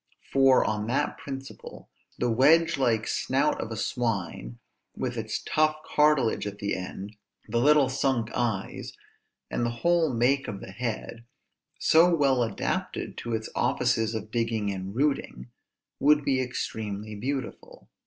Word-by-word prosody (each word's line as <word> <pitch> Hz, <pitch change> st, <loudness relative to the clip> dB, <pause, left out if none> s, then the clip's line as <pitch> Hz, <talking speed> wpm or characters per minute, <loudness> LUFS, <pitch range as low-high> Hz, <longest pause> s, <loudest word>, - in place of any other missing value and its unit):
For, 135 Hz, -1 st, +5 dB
on 105 Hz, 0 st, -1 dB
that 140 Hz, +5 st, -1 dB
principle, 135 Hz, -1 st, -9 dB, 0.3 s
the 120 Hz, -1 st, 0 dB
wedge 165 Hz, +8 st, +5 dB
like 115 Hz, -4 st, +2 dB
snout 140 Hz, +3 st, 0 dB
of -, -, -5 dB
a 110 Hz, -, -5 dB
swine, 100 Hz, -, -2 dB, 0.4 s
with -, -, -3 dB
its -, -, -3 dB
tough 155 Hz, 0 st, +2 dB
cartilage 150 Hz, -8 st, +2 dB
at 100 Hz, 0 st, -6 dB
the 100 Hz, 0 st, -2 dB
end, 95 Hz, +3 st, -7 dB, 0.3 s
the 115 Hz, +2 st, 0 dB
little 145 Hz, +1 st, +5 dB
sunk 130 Hz, -3 st, 0 dB
eyes, 110 Hz, -6 st, -2 dB, 0.6 s
and -, -, -1 dB
the 120 Hz, -, +1 dB, 0.2 s
whole 170 Hz, -3 st, +3 dB
make 130 Hz, +3 st, +1 dB
of 100 Hz, -, -5 dB
the 95 Hz, -, -9 dB
head, 115 Hz, +1 st, -5 dB, 0.5 s
so 165 Hz, +3 st, +5 dB
well 135 Hz, -5 st, +3 dB
adapted 115 Hz, -, -2 dB
to 120 Hz, -1 st, -3 dB
its 110 Hz, 0 st, -4 dB
offices 120 Hz, -3 st, +1 dB
of 110 Hz, 0 st, -5 dB
digging 115 Hz, -3 st, -1 dB
and 95 Hz, +1 st, -6 dB
rooting, 130 Hz, -, -1 dB, 0.5 s
would 150 Hz, 0 st, +4 dB
be 130 Hz, -1 st, +2 dB
extremely 110 Hz, -4 st, -4 dB
beautiful. 130 Hz, +5 st, -5 dB
120 Hz, 145 wpm, -27 LUFS, 110-135 Hz, 0.6 s, For